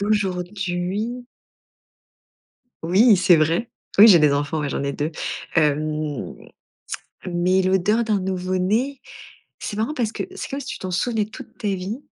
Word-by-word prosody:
d'aujourd'hui. 200 Hz, +2 st, -2 dB, 1.6 s
Oui, 200 Hz, +7 st, +5 dB
c'est 185 Hz, -1 st, +5 dB
vrai, 165 Hz, +9 st, +1 dB, 0.3 s
oui, 215 Hz, -, +10 dB
j'ai 185 Hz, -5 st, +8 dB
des 150 Hz, -2 st, +4 dB
enfants, 145 Hz, +2 st, -1 dB
ouais, 145 Hz, -2 st, -2 dB
j'en -, -, -2 dB
ai 140 Hz, 0 st, -1 dB
2, 150 Hz, +2 st, -2 dB, 0.4 s
hem, 150 Hz, -1 st, 0 dB, 0.9 s
mais 180 Hz, +1 st, +2 dB
l'odeur 190 Hz, +5 st, +2 dB
d'un 215 Hz, -3 st, +1 dB
nouveau 185 Hz, 0 st, -2 dB
né, 235 Hz, +9 st, 0 dB, 0.6 s
c'est 205 Hz, -, -5 dB
marrant 225 Hz, +8 st, -1 dB
parce 235 Hz, -7 st, -1 dB
que -, -, -4 dB
c'est -, -, -6 dB
comme 275 Hz, -, -4 dB
si 280 Hz, -, -8 dB
tu -, -, -5 dB
t'en 185 Hz, -, -5 dB
souvenais 215 Hz, +4 st, 0 dB
toute 210 Hz, -, -12 dB
ta 210 Hz, -, -2 dB
vie 195 Hz, +6 st, -3 dB
185 Hz, 155 wpm, -22 LUFS, 170-215 Hz, 1.6 s, oui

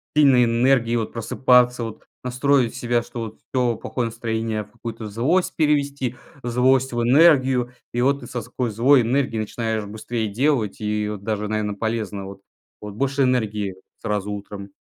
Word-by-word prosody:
сильной 135 Hz, -5 st, +6 dB
энергией 120 Hz, 0 st, +2 dB
вот 110 Hz, -2 st, -2 dB
просыпаться 125 Hz, +1 st, +3 dB
вот, 115 Hz, -2 st, -7 dB, 0.2 s
настроить 125 Hz, -1 st, +2 dB
себя, 120 Hz, -2 st, 0 dB
что 120 Hz, 0 st, -8 dB
вот: 110 Hz, -1 st, -7 dB
всё 125 Hz, -3 st, +2 dB
плохое 120 Hz, +2 st, -3 dB
настроение 115 Hz, -1 st, -2 dB
в -, -, -21 dB
какую-то 115 Hz, -2 st, -7 dB
злость 130 Hz, -, +1 dB
перевести, 140 Hz, -5 st, +1 dB, 0.3 s
злость 130 Hz, +2 st, +2 dB
в 120 Hz, -, 0 dB
энергию. 130 Hz, -2 st, +4 dB, 0.2 s
И 120 Hz, -, -1 dB
вот 140 Hz, +2 st, +2 dB
ты -, -, -9 dB
со 120 Hz, -, -4 dB
ской 125 Hz, 0 st, -3 dB
злой 125 Hz, +5 st, +4 dB
энергией 120 Hz, -1 st, 0 dB
начинаешь 110 Hz, 0 st, -3 dB
быстрее 110 Hz, +2 st, -4 dB
делать, 120 Hz, -1 st, 0 dB
и 105 Hz, 0 st, -1 dB
вот 105 Hz, -2 st, -6 dB
даже, 105 Hz, -1 st, -2 dB
наверно, 105 Hz, -1 st, -1 dB
полезно 105 Hz, -2 st, -3 dB
вот. 95 Hz, 0 st, -10 dB, 0.4 s
Вот 105 Hz, -1 st, -8 dB
больше 140 Hz, +3 st, +1 dB
энергии 105 Hz, -6 st, 0 dB, 0.3 s
сразу 105 Hz, -1 st, -2 dB
утром. 100 Hz, 0 st, -7 dB
120 Hz, 160 wpm, -22 LUFS, 110-130 Hz, 0.4 s, сильной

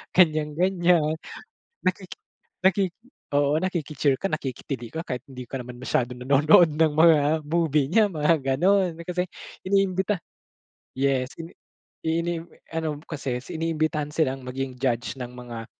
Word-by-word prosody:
ganyan-ganyan. 165 Hz, 0 st, +3 dB, 0.6 s
Nakiki 185 Hz, 0 st, -2 dB, 0.4 s
nakiki 190 Hz, -1 st, +3 dB, 0.4 s
oo, 145 Hz, +1 st, +3 dB
nakiki-cheer 155 Hz, -6 st, 0 dB
ka, 195 Hz, -, +1 dB
nakikitili 130 Hz, -2 st, -4 dB
ka, 160 Hz, -, -3 dB
kahit 125 Hz, -1 st, -4 dB
hindi 125 Hz, -3 st, -9 dB
ka 135 Hz, -, -3 dB
naman 125 Hz, 0 st, -10 dB
masyadong 125 Hz, -1 st, -1 dB
nanonood 150 Hz, +6 st, +6 dB
ng 160 Hz, -2 st, +3 dB
mga 160 Hz, 0 st, +6 dB, 0.3 s
movie 155 Hz, -4 st, +2 dB
niya, 215 Hz, +4 st, +5 dB
mga 155 Hz, +1 st, +3 dB, 0.2 s
gano'n, 185 Hz, +2 st, +3 dB
kasi 180 Hz, 0 st, 0 dB, 0.4 s
iniimbita. 190 Hz, 0 st, +1 dB, 0.8 s
Yes, 135 Hz, -2 st, +1 dB
ini 165 Hz, +1 st, -8 dB, 0.5 s
inim 165 Hz, +1 st, -1 dB, 0.3 s
ano 155 Hz, -2 st, -3 dB
kasi 135 Hz, -7 st, -4 dB
is -, -, -16 dB
iniimbitahan 155 Hz, -2 st, -1 dB
silang 135 Hz, -5 st, 0 dB
maging 130 Hz, 0 st, -4 dB
judge 125 Hz, 0 st, -1 dB
ng 125 Hz, -, -3 dB
mga, 120 Hz, -2 st, -7 dB
155 Hz, 130 wpm, -25 LUFS, 135-170 Hz, 0.8 s, nanonood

